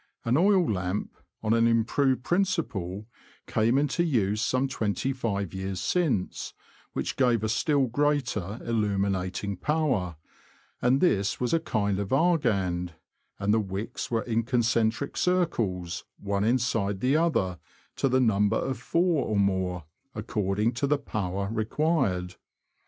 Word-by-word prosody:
An 115 +2 +2
oil 185 +1 +4
lamp, 95 -1 -2 0.3
on 110 0 +2
an 115 0 +4
im 115 -1 +3
proved 130 +1 +1
principle, 145 - -1 0.4
came 115 +4 +2
into 145 +4 +1
use 110 - +1
some 130 +2 +1
twenty 120 +1 -1
five 100 -7 -2
years 95 0 -4
since, 150 - -1 0.4
which - - -3
gave 120 -5 +3
a - - +1
still 140 +4 +2
greater 125 -6 -1
illuminating 100 -3 -1
power, 130 - 0 0.7
and 125 +3 +3
this 100 - +2
was 125 +3 0
a 165 - +4
kind 105 - -1
of 100 -1 -3
Argand, 100 - +1 0.4
and 100 +1 +1
the 110 - +4
wicks 100 +1 -4
were 115 -2 0
in 115 -1 0
concentric 115 +1 0
circles, 115 - 0
one 100 0 -1
inside 115 -4 +1
the 130 +6 +2
other, 125 - +1 0.4
to 135 - +1
the 130 +1 +3
number 105 -4 +3
of 130 -3 -2
four 165 +2 +1
or 105 - 0
more, 95 -3 0 0.3
according 105 +2 0
to 130 +4 -1
the 150 +1 +2
power 100 -7 -3
required. 110 - 0
115 Hz, 140 wpm, -27 LUFS, 100-135 Hz, 0.7 s, oil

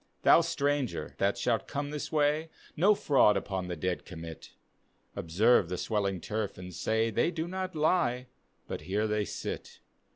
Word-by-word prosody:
Thou, - - +7
stranger 145 -5 -1
that 100 +1 +2
shalt 120 -2 0
come 145 0 -3
this 150 -1 -4
way. 150 +1 +2 0.3
No 195 +6 +5
fraud 130 - +4
upon 95 -2 -3
the 90 - -3
dead 90 +2 -2
commit, 80 0 -9 0.3
— - - -42 0.3
Observe 95 +3 +3
the 90 - -2
swelling 100 -3 -1
turf 105 +2 -3
and 90 0 -8
say, 110 +6 0
They 110 - +2
do 165 -1 -3
not 185 0 -4
lie, 150 -6 +2 0.4
but - - -5
here 105 +4 -1
they 105 -1 0
sit. - - -6
115 Hz, 165 wpm, -30 LUFS, 95-150 Hz, 0.4 s, Thou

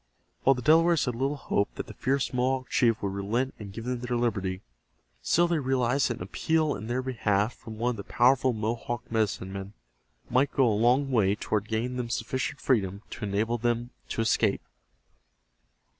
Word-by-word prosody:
While 135 - +4
the 125 - -6
Delawares 165 +3 +5
had 125 - -1
little 135 +5 -1
hope 100 -7 -1
that - - -4
the - - -10
fierce 135 0 -1
Mohawk 130 0 0
chief 115 -3 +2
would 100 -1 -1
relent 115 +7 -1
and 100 -2 -8
give 115 +3 -7
them 125 -1 -2
their 125 0 -2
liberty, 100 -6 -1 0.6
still 175 +1 +3
they 170 -2 +1
realized 130 0 +1
that 120 - -2
an - - -6
appeal 155 - 0
in 110 - -7
their 125 +2 -1
behalf 115 -3 0
from 110 -1 -10
one 120 +2 +1
of - - -4
the 100 - -6
powerful 130 +3 +3
Mohawk 115 +1 -3
medicine 105 -4 -1
men 100 +1 -6 0.5
might 130 +4 +2
go 135 - +4
a 110 - +3
long 125 +6 +3
way 105 -5 +3
toward 105 0 -2
gaining 120 +3 -2
them 120 -2 -3
sufficient 120 +3 -2
freedom 100 -5 0
to 110 - -5
enable 110 +4 0
them 120 +1 -1 0.2
to - - -1
escape. 110 -2 +2
120 Hz, 190 wpm, -28 LUFS, 105-130 Hz, 0.6 s, Delawares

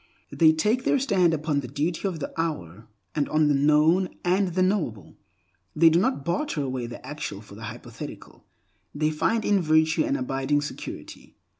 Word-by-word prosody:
They 160 -1 +5
take 210 +11 +1
their - - +3
stand 195 -10 +2
upon 155 -2 0
the 130 - -5
duty 155 - -2
of 175 -4 -4
the 140 - -5
hour, 115 - -4 0.3
and 145 - -1
on 155 -1 +3
the - - +4
known 150 +6 +3 0.2
and 190 +2 +2
the 185 +1 +1
knowable. 175 - -2 0.6
They 165 +1 +6
do 165 - +4
not 195 - 0
barter 170 - -1
away 130 -3 -3
the 120 - -10
actual - - -5
for - - -14
the - - -8
hypothetical. - - -10 0.5
They 155 +1 +1
find 220 +8 0
in 200 -2 +3
virtue 160 - +3
an 295 -2 0
abiding 145 - 0
security. 145 - -8
160 Hz, 175 wpm, -25 LUFS, 145-185 Hz, 0.6 s, They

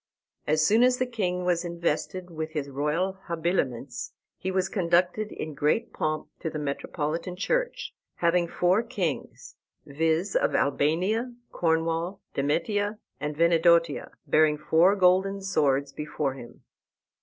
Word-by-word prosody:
As 155 +1 +3
soon 220 +7 +4
as 250 0 +4
the 255 - +1
king 180 -7 -2
was 175 -1 +1
invested 170 +1 -2
with 160 -1 -5
his 140 -3 -3
royal 165 +8 -1
habiliments 155 -7 -2 0.2
he 190 - -4
was 190 0 +1
conducted 185 +2 +1
in 155 - -5
great 150 +10 0
pomp 155 0 -2
to 160 - -3
the 155 - -5
metropolitan 155 +4 -3
church, - - -1 0.2
having 170 0 +2
four 180 +5 +2
kings, 200 - -4 0.3
viz., 160 +6 0
of - - +2
Albania, 185 - +1 0.2
Cornwall, 165 +3 0
Demetia, 205 +9 0 0.2
and 150 +1 -4
Venedotia, 170 -1 +3 0.2
bearing 155 -1 +3
four 165 +6 +4
golden 190 +1 +3
swords 140 -8 +1
before 150 -2 -2
him. 120 -3 -12
170 Hz, 130 wpm, -27 LUFS, 150-190 Hz, 0.3 s, soon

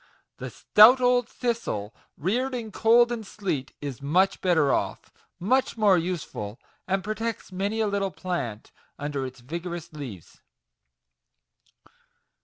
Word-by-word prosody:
The - - -6
stout 225 +5 +6
old 245 -1 +3
thistle, 225 - -3 0.2
reared 250 - 0
in 225 -3 -5
cold 235 +3 +4
and 235 -2 -3
sleet, 185 -10 -4
is 140 -4 -5
much 180 +7 +2
better 160 -7 +3
off - - -2 0.3
much 255 +7 +1
more 210 -3 +5
useful, 165 - -3 0.3
and 195 0 0
protects 220 +1 -4
many 200 +4 -2
a 215 - +2
little 200 -1 0
plant 170 - -4 0.3
under 145 -2 -3
its 130 -1 -12
vigorous 170 +4 -6
leaves. 125 - -9
185 Hz, 125 wpm, -26 LUFS, 145-225 Hz, 0.3 s, stout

